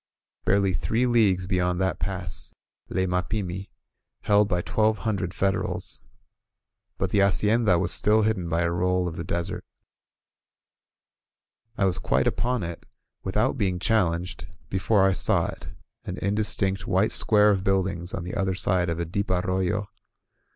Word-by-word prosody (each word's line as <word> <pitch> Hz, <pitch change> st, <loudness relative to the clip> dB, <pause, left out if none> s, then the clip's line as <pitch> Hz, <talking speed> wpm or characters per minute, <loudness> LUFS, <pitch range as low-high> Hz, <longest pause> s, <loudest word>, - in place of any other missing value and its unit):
Barely 100 Hz, -1 st, +2 dB
three 110 Hz, +9 st, 0 dB
leagues 105 Hz, -7 st, +3 dB
beyond 90 Hz, -1 st, 0 dB
that 95 Hz, -3 st, 0 dB
pass 90 Hz, -1 st, -5 dB, 0.3 s
lay 95 Hz, -, 0 dB
Mapimi, 90 Hz, +1 st, -2 dB, 0.5 s
held 105 Hz, 0 st, +3 dB
by 90 Hz, -2 st, -1 dB
twelve 110 Hz, 0 st, +1 dB
hundred 100 Hz, -5 st, -1 dB
Federals. 95 Hz, 0 st, -2 dB, 1.0 s
But -, -, -2 dB
the 100 Hz, -, +2 dB
hacienda 105 Hz, 0 st, +3 dB
was 90 Hz, 0 st, 0 dB
still 110 Hz, +1 st, +4 dB
hidden 95 Hz, -6 st, 0 dB
by 85 Hz, +1 st, +1 dB
a 85 Hz, -, 0 dB
roll 90 Hz, +1 st, +1 dB
of 85 Hz, -, -5 dB
the 85 Hz, -, -4 dB
desert. 85 Hz, 0 st, -3 dB, 2.1 s
I 100 Hz, -, +2 dB
was 95 Hz, 0 st, +1 dB
quite -, -, +1 dB
upon 125 Hz, -3 st, 0 dB
it, 85 Hz, 0 st, -6 dB, 0.4 s
without 105 Hz, +8 st, 0 dB
being 95 Hz, -4 st, 0 dB
challenged, 90 Hz, -3 st, 0 dB, 0.2 s
be 95 Hz, -, 0 dB
fore 95 Hz, 0 st, +3 dB
I 95 Hz, -, +2 dB
saw -, -, +2 dB
it, -, -, -12 dB, 0.4 s
an -, -, -6 dB
indistinct 100 Hz, -2 st, -1 dB
white 95 Hz, +3 st, +2 dB
square 105 Hz, -1 st, +4 dB
of 95 Hz, -2 st, 0 dB
buildings 95 Hz, -2 st, 0 dB
on 95 Hz, -, -4 dB
the 90 Hz, -, -6 dB
other 95 Hz, -1 st, 0 dB
side 90 Hz, -2 st, 0 dB
of 85 Hz, -, -2 dB
a 85 Hz, -, -1 dB
deep 100 Hz, +5 st, -3 dB
arroyo. 95 Hz, +2 st, 0 dB
95 Hz, 150 wpm, -25 LUFS, 90-105 Hz, 2.1 s, still